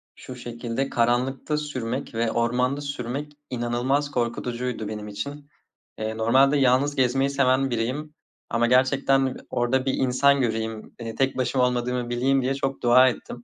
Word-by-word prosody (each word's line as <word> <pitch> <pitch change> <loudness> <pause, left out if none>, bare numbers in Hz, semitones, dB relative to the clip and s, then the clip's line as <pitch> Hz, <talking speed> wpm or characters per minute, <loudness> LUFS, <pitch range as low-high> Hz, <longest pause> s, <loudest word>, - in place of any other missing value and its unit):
Şu 130 - -10
şekilde, 120 +2 -4
karanlıkta 125 +5 0
sürmek 130 -4 -4
ve 115 0 0
ormanda 125 +4 0
sürmek 140 +1 -5 0.2
inanılmaz 125 +4 -1
korkutucuydu 120 -2 -2
benim 105 0 -6
için. 140 +8 -7 0.5
Eee, 110 0 -3
normalde 135 +6 +4
yalnız 135 +2 +3
gezmeyi 135 +1 +2
seven 135 -1 +2
biriyim. 130 +6 -3 0.4
Ama 120 0 +1
gerçekten 130 +1 +3
orada 130 +2 0
bir 135 - +1
insan 135 +2 +3
göreyim. 110 -2 -3
Eee, 115 -1 -6
tek 135 -1 0
başıma 130 0 +2
olmadığımı 125 0 -2
bileyim 135 +3 +2
diye 130 +2 0
çok 135 -1 -3
dua 125 +2 +6
ettim. 120 0 -8
125 Hz, 145 wpm, -24 LUFS, 120-135 Hz, 0.5 s, dua